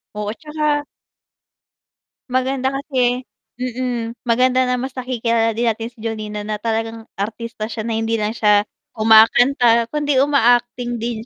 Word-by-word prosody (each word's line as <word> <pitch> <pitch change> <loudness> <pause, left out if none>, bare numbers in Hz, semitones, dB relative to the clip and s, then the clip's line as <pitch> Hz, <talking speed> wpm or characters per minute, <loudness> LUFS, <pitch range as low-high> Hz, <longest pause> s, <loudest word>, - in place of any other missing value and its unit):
Oo 210 - -4
at - - -10
tsaka 300 -1 -1 1.5
maganda 260 +1 0
kasi 260 -3 -1 0.3
mm, 245 -2 -3
maganda 255 +2 +2
na 250 - +1
mas 260 +1 -4
nakikilala 235 -3 0
din 240 - +1
natin 225 0 -1
si 240 - -34
Jolina 215 -2 -5
na 210 -1 -4
talagang 225 0 -3
artista 220 +2 -4
siya 225 0 -5
na 225 0 -2
hindi 225 0 -1
lang 215 +2 -2
siya 210 -1 +3 0.2
kumakanta 230 +2 +5
kundi 290 -3 +1
uma-acting 245 -3 +2
din 230 -1 -4
235 Hz, 140 wpm, -19 LUFS, 225-255 Hz, 1.5 s, kumakanta